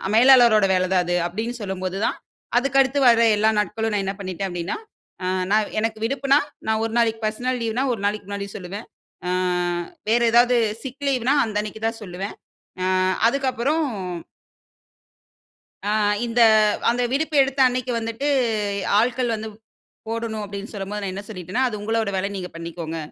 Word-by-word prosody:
மேலாளருடைய 235 Hz, -5 st, +6 dB
வேலை 185 Hz, 0 st, +1 dB
தான் 180 Hz, -, +3 dB
அது." 175 Hz, 0 st, 0 dB
அப்படின்னு 220 Hz, +7 st, -4 dB
சொல்லும்போது 190 Hz, -1 st, -4 dB
தான் -, -, -2 dB, 0.4 s
அதுக்கு 275 Hz, +1 st, +1 dB
அடுத்து 270 Hz, +1 st, +1 dB
வர்ற 230 Hz, -1 st, +6 dB, 0.2 s
எல்லா 215 Hz, +1 st, +3 dB
நாட்களும் 220 Hz, +1 st, -1 dB
நான் 200 Hz, -1 st, 0 dB
என்ன 195 Hz, -, -2 dB
பண்ணிட்டேன்? 190 Hz, 0 st, -4 dB
அப்படின்னா 175 Hz, +1 st, -3 dB, 1.0 s
எனக்கு 220 Hz, 0 st, -1 dB
விடுப்புன்னா, 275 Hz, +3 st, +2 dB, 0.3 s
நான் 220 Hz, 0 st, +1 dB
ஒரு 225 Hz, -, -2 dB
நாளைக்கு 225 Hz, -1 st, +2 dB
பெர்சனல் 245 Hz, +4 st, -1 dB
லீவ்ன்னா, 230 Hz, +3 st, -1 dB
ஒரு 235 Hz, -, -2 dB
நாளைக்கு 205 Hz, 0 st, -1 dB
முன்னாடி 200 Hz, 0 st, -4 dB
சொல்லுவேன். 195 Hz, +3 st, -7 dB, 1.2 s
வேற 230 Hz, +2 st, +4 dB
ஏதாச்சு 240 Hz, +1 st, +5 dB, 0.2 s
சிக் 265 Hz, +1 st, -7 dB
லீவ்ன்னா 260 Hz, -1 st, +2 dB
அந்த 220 Hz, -2 st, -5 dB
அன்னைக்கு 215 Hz, +1 st, -8 dB
தான் 225 Hz, 0 st, -3 dB
சொல்லுவேன். 190 Hz, 0 st, -6 dB, 0.5 s
அ -, -, +1 dB, 0.4 s
அதுக்கப்புறம். 270 Hz, +4 st, 0 dB, 2.0 s
ஆ, -, -, 0 dB, 0.4 s
இந்த 235 Hz, 0 st, +1 dB, 0.5 s
அந்த 240 Hz, +1 st, +1 dB
விடுப்பு 305 Hz, +3 st, -1 dB
எடுத்த 270 Hz, +1 st, -4 dB
அன்னக்கி 255 Hz, 0 st, -2 dB
வந்துட்டு 230 Hz, +5 st, -3 dB, 0.7 s
ஆட்கள் 240 Hz, +1 st, +1 dB
வந்து, 220 Hz, 0 st, -6 dB, 0.6 s
போடணும் 225 Hz, -1 st, -3 dB
அப்பிடின்னு 200 Hz, +1 st, -7 dB
சொல்லும்போது 205 Hz, +1 st, -5 dB
நான் 195 Hz, -, -2 dB
என்ன 195 Hz, -, -5 dB
சொல்லிட்டேன்னா, 185 Hz, +3 st, -3 dB
அது 230 Hz, -, -4 dB
உங்களோட 225 Hz, 0 st, 0 dB
வேல 190 Hz, +1 st, 0 dB
நீங்க 180 Hz, -2 st, -5 dB
பண்ணிக்கோங்க. 165 Hz, -1 st, -6 dB
220 Hz, 150 wpm, -23 LUFS, 200-245 Hz, 2.0 s, மேலாளருடைய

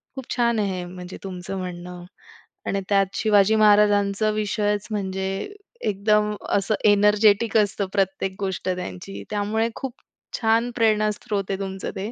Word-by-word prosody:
खूप 265 Hz, -2 st, -8 dB
छान 235 Hz, -2 st, +2 dB
आहे 195 Hz, -3 st, -1 dB
हे 175 Hz, -, -5 dB
म्हणजे 180 Hz, 0 st, -9 dB
तुमचं 185 Hz, 0 st, -6 dB
म्हणणं 180 Hz, -1 st, -7 dB, 0.6 s
आणि 195 Hz, 0 st, 0 dB
त्यात 195 Hz, -1 st, +4 dB
शिवाजी 210 Hz, 0 st, +4 dB
महाराजांचं 210 Hz, -1 st, +4 dB
विषयच 210 Hz, -1 st, -1 dB
म्हणजे 190 Hz, -2 st, -2 dB, 0.6 s
एकदम 210 Hz, +1 st, +2 dB, 0.2 s
असं 200 Hz, +2 st, 0 dB
एनर्जेटिक 210 Hz, +1 st, +4 dB
असतं 205 Hz, -1 st, +1 dB
प्रत्येक 195 Hz, 0 st, 0 dB
गोष्ट 190 Hz, -1 st, -3 dB
त्यांची. 100 Hz, -, -5 dB
त्यामुळे 215 Hz, +2 st, 0 dB
खूप 265 Hz, -3 st, -5 dB, 0.5 s
छान 230 Hz, +2 st, +2 dB
प्रेरणास्रोत 215 Hz, -1 st, +1 dB
आहे 195 Hz, -, -2 dB
तुमचं 190 Hz, -1 st, -4 dB
ते. 205 Hz, +4 st, -4 dB
205 Hz, 135 wpm, -23 LUFS, 190-215 Hz, 0.6 s, त्यात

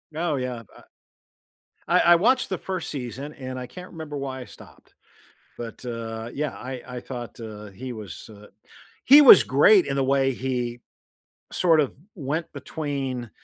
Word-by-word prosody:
Oh, 165 Hz, -2 st, 0 dB
yeah, 125 Hz, -3 st, -4 dB, 1.2 s
I -, -, +2 dB
I -, -, +7 dB
I -, -, +7 dB
watched 245 Hz, +8 st, +2 dB
the 185 Hz, -, -2 dB
1st 185 Hz, -3 st, -5 dB
season, 135 Hz, +2 st, -6 dB
and 130 Hz, -2 st, -7 dB
I 125 Hz, -, -6 dB
can't 180 Hz, +9 st, -11 dB
remember 155 Hz, -4 st, -7 dB
why 130 Hz, -1 st, -5 dB
I -, -, -8 dB
stopped. -, -, -17 dB, 0.6 s
But, 115 Hz, 0 st, -8 dB
uh, 115 Hz, -1 st, -5 dB
yeah, 150 Hz, 0 st, -2 dB
I 130 Hz, 0 st, -7 dB
I 125 Hz, 0 st, -6 dB
thought, 120 Hz, -2 st, -8 dB
uh, 105 Hz, -2 st, -8 dB
he 125 Hz, +6 st, -8 dB
was 105 Hz, -1 st, -9 dB
uh, 105 Hz, 0 st, -14 dB, 0.6 s
he 285 Hz, +3 st, +9 dB
was 275 Hz, -, +10 dB
great 430 Hz, -7 st, +5 dB
in -, -, -2 dB
the 135 Hz, -, +1 dB
way 135 Hz, 0 st, +2 dB
he 125 Hz, -2 st, -3 dB, 0.7 s
sort 165 Hz, -3 st, +3 dB
of 140 Hz, -, +1 dB, 0.2 s
went 155 Hz, +2 st, -3 dB
between, 135 Hz, -6 st, -4 dB
130 Hz, 165 wpm, -25 LUFS, 120-155 Hz, 1.2 s, was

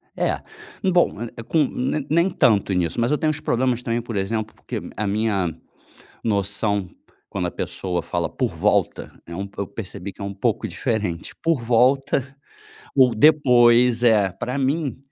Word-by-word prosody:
É, -, -, -1 dB, 0.5 s
bom, 175 Hz, -, +2 dB
é 120 Hz, -, -4 dB
é 115 Hz, -, -6 dB
com 155 Hz, +6 st, +2 dB
ne 135 Hz, +2 st, -2 dB
nem 170 Hz, +4 st, +3 dB
tanto 110 Hz, -, +2 dB
nisso, 90 Hz, +3 st, 0 dB
mas 120 Hz, +3 st, +1 dB
eu 150 Hz, -, +2 dB
tenho 155 Hz, -, +1 dB
uns 155 Hz, -, -3 dB
problemas 125 Hz, -3 st, 0 dB
também, 115 Hz, 0 st, -1 dB
por 115 Hz, -2 st, -7 dB
exemplo, 110 Hz, +2 st, -2 dB
porque -, -, -6 dB, 0.2 s
a 105 Hz, 0 st, -2 dB
minha 100 Hz, -5 st, 0 dB, 0.7 s
noção, 100 Hz, -1 st, 0 dB, 0.4 s
quando -, -, -2 dB
a -, -, -2 dB
pessoa 90 Hz, -3 st, -3 dB
fala -, -, -2 dB
por -, -, -1 dB
volta, -, -, 0 dB
é 85 Hz, -, -8 dB
um 100 Hz, +3 st, -4 dB
po 100 Hz, 0 st, -6 dB
eu -, -, -4 dB
percebi 100 Hz, -2 st, -7 dB
que -, -, -20 dB
é 100 Hz, -, -4 dB
um 100 Hz, 0 st, -5 dB
pouco 95 Hz, -, -1 dB
diferente. 105 Hz, -7 st, -3 dB
Por 165 Hz, -5 st, +1 dB
volta 130 Hz, +3 st, +2 dB, 0.6 s
ou 130 Hz, -3 st, +5 dB
depois 125 Hz, -4 st, +5 dB
é, 105 Hz, -5 st, +4 dB
pra 125 Hz, +8 st, -4 dB
mim 140 Hz, +1 st, 0 dB
115 Hz, 175 wpm, -22 LUFS, 100-130 Hz, 0.7 s, ou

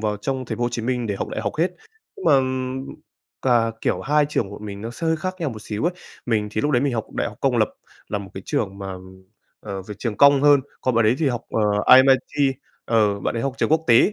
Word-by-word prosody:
vào 105 Hz, -1 st, -1 dB
trong 130 Hz, +5 st, -3 dB
thành 120 Hz, -, -5 dB
phố 120 Hz, -, -1 dB
Hồ -, -, +1 dB
Chí 120 Hz, -1 st, -3 dB
Minh 125 Hz, 0 st, -1 dB
để 105 Hz, -, -1 dB
học -, -, -4 dB
đại -, -, -4 dB
học 105 Hz, -2 st, -2 dB
hết, 175 Hz, +2 st, +1 dB, 0.4 s
nhưng 390 Hz, -, -9 dB
mà 135 Hz, -, +6 dB, 1.0 s
cả, 120 Hz, -3 st, +3 dB
kiểu, -, -, 0 dB
hai 150 Hz, +2 st, +2 dB
trường 100 Hz, -9 st, -1 dB
bọn 100 Hz, +1 st, -9 dB
mình 100 Hz, -1 st, -7 dB
nó 115 Hz, +2 st, -5 dB
sẽ 165 Hz, +8 st, -5 dB
hơi 160 Hz, -, +2 dB
khác 185 Hz, +4 st, -4 dB
nhau 160 Hz, -, 0 dB
một 110 Hz, -2 st, -9 dB
xíu 105 Hz, +7 st, -4 dB
ấy. 175 Hz, -, +2 dB, 0.3 s
Mình 110 Hz, -3 st, 0 dB
thì 110 Hz, -, -1 dB
lúc 145 Hz, -, 0 dB
đấy 125 Hz, -3 st, +2 dB
mình 140 Hz, -2 st, +1 dB
học 115 Hz, -, -2 dB
đại -, -, -1 dB
học -, -, -12 dB
công -, -, +2 dB
lập -, -, +3 dB, 0.4 s
là -, -, -2 dB
một 100 Hz, -2 st, -9 dB
cái 95 Hz, -, -7 dB
trường 100 Hz, -9 st, -2 dB
mà, 95 Hz, -1 st, -5 dB, 0.7 s
ờ, 100 Hz, -2 st, -6 dB
về 105 Hz, +3 st, -8 dB
trường 115 Hz, -4 st, -3 dB
công 140 Hz, -1 st, +6 dB
hơn, 145 Hz, -1 st, +6 dB, 0.2 s
còn 130 Hz, -, 0 dB
bạn 115 Hz, 0 st, +3 dB
ấy 110 Hz, -, +4 dB
thì 155 Hz, -4 st, +2 dB
học, 120 Hz, -2 st, -2 dB
ờ, -, -, 0 dB, 0.4 s
RMIT, 135 Hz, +1 st, +4 dB, 0.3 s
ờ, 105 Hz, -3 st, +2 dB
bạn -, -, -2 dB
ấy 115 Hz, -, -1 dB
học 140 Hz, -2 st, -2 dB
trường -, -, +1 dB
quốc 160 Hz, +1 st, +2 dB
tế. 120 Hz, -, +5 dB
120 Hz, 265 wpm, -22 LUFS, 105-140 Hz, 1.0 s, mà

